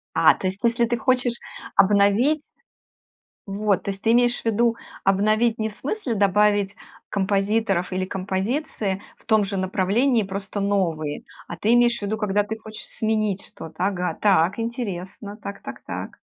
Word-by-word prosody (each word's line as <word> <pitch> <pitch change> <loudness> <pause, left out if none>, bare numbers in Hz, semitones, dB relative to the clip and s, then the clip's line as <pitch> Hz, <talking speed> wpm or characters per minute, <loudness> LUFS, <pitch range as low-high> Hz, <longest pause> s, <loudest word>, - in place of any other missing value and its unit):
А, - - +6
то 190 - -3
есть, 190 +2 -3
если 235 0 +3
ты 240 +1 0
хочешь 250 0 +1 0.4
обновить 205 +10 +4 1.0
Вот. 200 0 0
То - - -3
есть, 195 0 -4
ты 225 - +3
имеешь 245 0 +3
в - - -27
виду, 230 +1 +2 0.3
обновить 215 +4 +2
не 220 - 0
в 210 - -11
смысле 270 - -3
добавить 205 0 +3 0.3
композиторов 195 -1 0
или 185 0 -1
композиции 195 +2 -2 0.2
в - - -23
том 220 -2 +4
же 200 0 -3
направлении, 200 +6 +2
просто 195 +1 -4
новые, 170 -7 -1 0.2
а 170 - -7
ты 220 +7 +2
имеешь 240 -1 +4
в - - -17
виду, 210 +2 -2
когда 205 -1 +1
ты 220 +2 -5
хочешь 215 0 -10
сменить 215 -3 -1
что-то. 160 0 -10
Ага, 180 -2 -1
так, 195 0 +3
интересно, 205 -3 -5
так 200 -2 -8
так - - -8
так. - - -6
205 Hz, 160 wpm, -23 LUFS, 195-225 Hz, 1.0 s, А